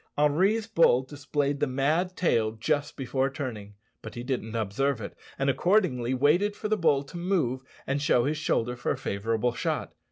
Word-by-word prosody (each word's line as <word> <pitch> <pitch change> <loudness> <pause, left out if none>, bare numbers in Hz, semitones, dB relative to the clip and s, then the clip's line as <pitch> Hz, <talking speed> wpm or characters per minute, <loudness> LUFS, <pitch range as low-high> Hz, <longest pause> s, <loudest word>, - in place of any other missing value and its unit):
Henri's 185 +10 +3
bull 165 - +4
displayed 145 +1 -2
the - - +1
mad 155 +8 0
tail 115 -11 +2
just 145 +6 -1
before 135 0 0
turning, 115 -7 -6 0.3
but - - -9
he 120 - -5
didn't 120 -4 -3
observe 115 +5 0
it, 100 - -7 0.2
and, 135 - 0
accordingly, 135 - +2
waited 170 +10 +3
for 215 - -4
the 215 - +2
bull 145 -7 +2
to 140 +5 -10
move 170 -9 0 0.2
and 140 +1 -1
show 125 -4 +3
his 150 +1 -1
shoulder 125 -5 0
for 120 - -4
a - - -1
favourable 115 +4 -1
shot. - - -2
135 Hz, 180 wpm, -27 LUFS, 120-155 Hz, 0.3 s, bull